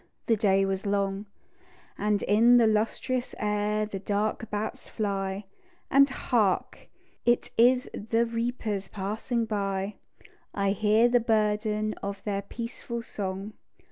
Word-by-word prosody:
The 230 - +3
day 195 -2 +3
was 195 +1 -2
long; 200 0 -1 0.7
And 210 0 0
in 230 +4 +5
the 235 - +5
lustrous 225 +4 0
air 210 0 0
the 205 -2 -6
dark 210 +2 -1
bats 210 +1 -4
fly; 195 -2 -2 0.5
And 275 +1 +6
Hark! 225 -7 0 0.4
It 240 0 +2
is 250 +2 +4
the 225 +2 0
reapers 230 -4 -2
passing 220 +5 -2
by, 200 -2 -2 0.6
I 200 -1 +1
hear 215 +3 +4
the 245 0 +4
burden 215 -1 +1
of 200 0 -5
their 200 -2 -1
peaceful 235 +2 -6
song. 195 0 -5
210 Hz, 125 wpm, -28 LUFS, 200-230 Hz, 0.7 s, And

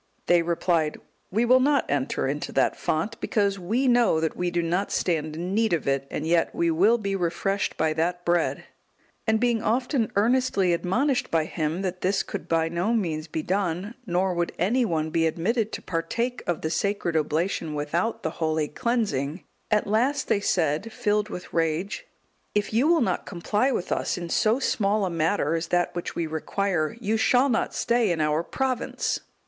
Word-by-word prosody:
They 175 -1 +4
replied, 165 -2 0 0.3
"We 225 +5 +1
will 255 +2 +6
not 280 0 +3
enter 140 -1 -1
into 145 +2 -3
that - - +2
font, 200 +9 -2
because 200 -4 0
we 225 +9 0
know 240 -9 +4
that 160 0 -1
we 180 0 -1
do 175 0 -1
not 180 +4 -1
stand 155 -3 -1
in 175 +4 -3
need 220 -1 +2
of 165 - -1
it, 135 0 0
and 150 - -4
yet 165 0 +1
we 170 -1 +2
will 200 +9 +4
be 200 -3 -2
refreshed 195 +2 -1
by 160 0 +1
that 175 +3 -1
bread." 175 -1 +1 0.6
And 220 0 +3
being 235 -2 +1
often 245 +1 0
earnestly 205 -4 +2
admonished 245 - 0
by 160 -2 +1
him, 160 +3 -2
that 185 -1 -3
this 190 +2 +1
could - - -6
by 165 -1 +2
no 175 +8 0
means 160 -7 -1
be 160 0 -4
done, 190 +2 -1
nor 180 +1 +1
would 175 0 -1
any 235 +8 +2
one 160 -5 -1
be 165 0 +2
admitted 215 +7 0
to - - -5
partake 230 +9 -2
of 175 -2 -1
the 160 - -2
sacred 190 -1 -1
Oblation 160 +1 0
without 165 +9 -1
the 160 - -1
holy 160 -2 -1
cleansing, 180 - -1 0.3
at 215 -1 +2
last, 255 +6 +1
they - - +3
said, 175 +1 0
filled 210 0 0
with 180 - -8
rage, 165 - -1 0.5
"If 210 +1 0
you 245 +7 +3
will 335 -2 +4
not 235 - -1
comply 210 +7 0
with 185 -7 -3
us - - 0
in 175 -1 -5
so 220 +6 +2
small 210 -6 +1
a 185 - -2
matter 165 -1 +1
as 165 0 -1
that 175 +1 +1
which 175 - -5
we 170 - -1
require, 160 +3 -1
you 220 0 0
shall 255 +4 +3
not 230 - 0
stay 235 -4 +2
in 165 - -1
our 150 +1 +2
province." 260 +7 -2
180 Hz, 185 wpm, -25 LUFS, 165-220 Hz, 0.6 s, will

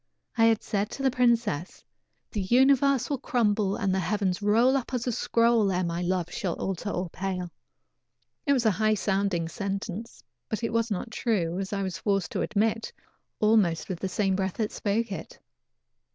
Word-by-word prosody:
I 225 - +4
had 225 -1 +3
said 205 0 -1
to 275 - -5
the 265 - +3
princess: 235 - +1 0.5
"The 210 - -2
universe 265 +4 +4
will 285 -3 -2
crumble 210 -7 +1
and 195 -2 0
the 190 - +1
heavens 190 0 -1
roll 230 +6 +4
up 260 -1 -2
as 245 - -2
a 250 - 0
scroll 230 -2 +2
ere 185 0 0
my 170 0 -2
love 180 -1 -1
shall 190 -6 -2
alter 195 +2 -3
or 180 -2 -2
pale." 180 -2 -4 1.0
It 280 - +5
was 250 -4 +1
a 220 - +5
high 215 +2 +2
sounding 195 -4 0
sentence, 200 +4 -5 0.3
but 220 +1 -3
it 230 - -1
was 230 0 +1
not 210 +3 -3
true, 190 -7 -1
as 195 -1 -4
I 200 -1 -1
was 185 -3 -4
forced 195 -2 0
to - - -2
admit, 220 +2 0 0.5
almost 210 -7 +2
with 180 -3 -3
the 190 - -2
same 190 0 +1
breath 190 -1 -1
that 215 -2 -1
spoke 215 +2 -1
it. 195 - -7
205 Hz, 185 wpm, -27 LUFS, 190-230 Hz, 1.0 s, It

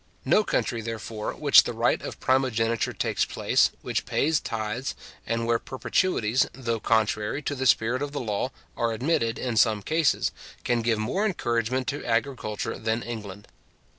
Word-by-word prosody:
No 215 - +4
country, 120 - -1
therefore, 110 -1 -5
which - - +7
the - - -4
right - - +2
of - - -7
primogeniture 115 -5 +1
takes - - 0
place, - - +2
which - - -2
pays 155 +1 +2
tithes, 115 +3 -3 0.3
and 115 0 -1
where 115 0 +2
perpetuities, 130 -4 +1
though 115 -3 -2
contrary 110 +4 0
to 145 - -2
the 130 -1 -1
spirit 120 +3 +3
of 145 -1 -3
the 145 - -3
law, 110 0 -2 0.3
are 115 -1 0
admitted 115 -2 0
in 120 -3 -2
some 105 -2 +3
cases, 160 +2 +1 0.3
can 120 -1 +1
give 115 -1 +1
more 120 - -1
encouragement 125 - 0
to 145 +1 -4
agriculture 115 -3 -2
than 110 +1 -1
England. 105 -4 -7
115 Hz, 160 wpm, -26 LUFS, 110-130 Hz, 0.3 s, which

